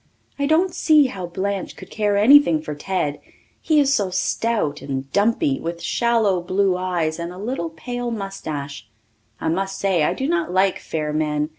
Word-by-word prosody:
I 280 - +1
don't 345 +4 +2
see 305 -3 +4
how 195 -9 -4
Blanche 195 +2 -3
could - - -12
care 205 -2 0
anything 215 - +6
for 155 -1 -6
Ted 150 -2 -2 0.4
he 310 -2 +3
is 280 -1 +3
so 200 -7 +1
stout 190 -3 -1
and 135 -1 -5
dumpy; 200 -10 +1
with 170 +1 -5
shallow 225 -4 +1
blue 185 +1 +1
eyes 175 -3 -1
and 170 +1 -4
a 180 - -10
little 205 -4 -3
pale 245 +9 -5
moustache. 155 - -6 0.5
I - - -3
must 195 +3 -2
say 190 -4 +1
I - - +1
do 265 - -2
not 345 - 0
like 190 +1 +2
fair 150 -2 -3
men. 150 -1 0
190 Hz, 175 wpm, -21 LUFS, 160-230 Hz, 0.5 s, anything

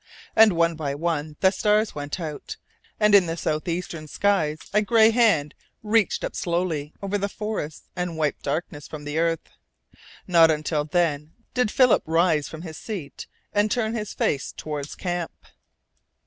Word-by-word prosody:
And 220 -3 +7
one 170 0 +2
by 150 -3 -3
one 155 -1 -2
the 190 - +5
stars 210 +1 +1
went 145 +4 -5
out, 155 -4 -6 0.4
and 210 -1 +4
in 195 -4 +7
the 165 +1 -3
south 155 -1 -2
eastern 170 -2 -4
skies 160 -3 +1 0.2
a 210 - +4
gray 220 +1 +5
hand 215 -11 +3 0.3
reached 215 -1 +2
up - - -4
slowly 170 -4 -1
over 200 +1 -1
the 200 +1 -1
forests 210 -8 -5
and 180 -2 -3
wiped 150 -3 -1
darkness 150 0 -4
from 150 -1 -8
the 145 +2 -2
earth. 165 -1 0 0.8
Not 165 -3 +6
until 150 -1 0
then 155 -2 0 0.2
did 250 -4 +1
Philip 250 +1 +4
rise 165 -2 +2
from 160 +1 -8
his 160 -3 -8
seat 185 -11 -7 0.3
and 205 +1 +2
turn 225 -1 0
his 215 -3 -4
face 140 -1 -1
toward 150 -2 -5
camp. 175 -2 -3
170 Hz, 160 wpm, -24 LUFS, 150-205 Hz, 0.8 s, And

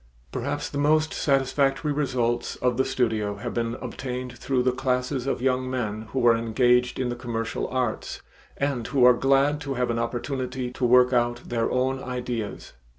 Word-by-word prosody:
Perhaps 145 +3 -3
the 145 - -3
most 155 +2 +3
satisfactory 135 +1 +1
results 120 -4 -1
of 125 -1 0
the 130 - +2
studio 110 -6 0
have 115 +4 -5
been 115 -1 -1
obtained 125 0 -5
through 130 0 0
the 130 - +3
classes 125 +1 -1
of 130 - -1
young 130 -1 +1
men 110 -4 -3
who 130 -2 0
are 115 -1 +7
engaged 120 +2 +2
in 125 -1 0
the 120 - -2
commercial 115 -2 -3
arts, 125 -4 -2 0.4
and 140 -5 -1
who 135 -4 +3
are 125 - +8
glad 135 +3 +2
to 140 -3 -3
have 125 -1 0
an 115 - -1
opportunity 125 +1 -3
to 125 - -2
work 125 +1 +5
out 120 0 +1
their 115 -1 0
own 130 +1 0
ideas. 125 -4 -4
125 Hz, 175 wpm, -25 LUFS, 120-135 Hz, 0.4 s, are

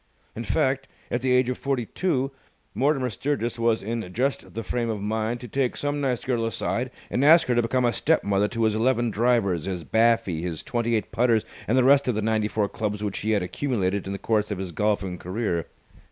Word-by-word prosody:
In 115 - -4
fact, 135 +1 0 0.2
at 120 - 0
the 130 0 +1
age 125 0 +4
of 125 - -2
forty 135 -4 -1
two, 135 - -1 0.4
Mortimer 130 +1 +1
Sturgis 120 0 -2
was 115 -2 +2
in 110 -3 -4
just 135 +5 -2
the 115 - -3
frame 120 0 -2
of 110 -2 -2
mind 110 +3 -2
to 125 - -7
take 130 +2 -1
some 145 0 -1
nice 130 -4 -1
girl 120 -3 0
aside 120 +2 -2 0.2
and 130 - +1
ask 160 +3 +7
her 125 - +1
to 120 - +3
become 125 +2 +1
a 120 - +2
step 160 +1 +2
mother 100 0 +2
to 115 +1 -2
his 110 -1 +3
eleven 120 0 +2
drivers, 105 -7 +1
his 90 -3 -3
baffy, 110 -7 +2
his 85 -3 -4
twenty 120 -1 0
eight 110 - -2
putters, 115 -2 +2 0.2
and 120 - +2
the 130 - +5
rest 140 +1 +5
of 125 - +1
the 110 - 0
ninety 110 -1 +1
four 105 -1 0
clubs 105 -1 -3
which 100 -2 -2
he 110 - -3
had 105 -4 +2
accumulated 100 -3 -1
in - - -3
the - - -3
course 105 0 0
of 105 - -3
his 95 -1 -5
golfing 95 -1 -1
career. 90 -3 -2
115 Hz, 225 wpm, -25 LUFS, 105-125 Hz, 0.4 s, ask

